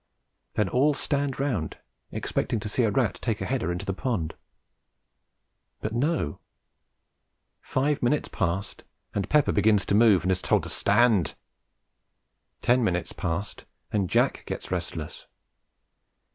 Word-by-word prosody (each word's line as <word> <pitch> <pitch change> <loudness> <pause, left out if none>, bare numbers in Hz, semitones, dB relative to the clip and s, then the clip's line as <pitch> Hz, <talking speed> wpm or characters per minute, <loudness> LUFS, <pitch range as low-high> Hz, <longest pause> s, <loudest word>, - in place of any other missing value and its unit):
Then 105 - +2
all 140 +8 +3
stand 140 -2 -1
round 120 - -1 0.3
expecting 115 - -1
to 105 - -4
see 105 - 0
a - - +3
rat 120 -3 +1
take 110 -4 -1
a - - -3
header 125 -9 -1
into 90 +3 -4
the 95 - -1
pond; 100 - -2 1.5
but 110 - -3
no, 130 - 0 1.2
five 140 +2 0
minutes 140 +5 +1
pass, 95 +2 -1 0.4
and 100 - -2
Pepper 150 -2 +4
begins 105 -2 +3
to - - 0
move, 105 -3 +5
and 95 - +1
is 95 - 0
told - - +2
to - - -6
"stand." 110 - +3 1.3
Ten 125 0 +4
minutes 90 -4 -1
pass, 90 +5 -3 0.4
and 100 -4 0
Jack - - +2
gets - - -5
restless. - - -4
110 Hz, 135 wpm, -27 LUFS, 95-130 Hz, 1.5 s, move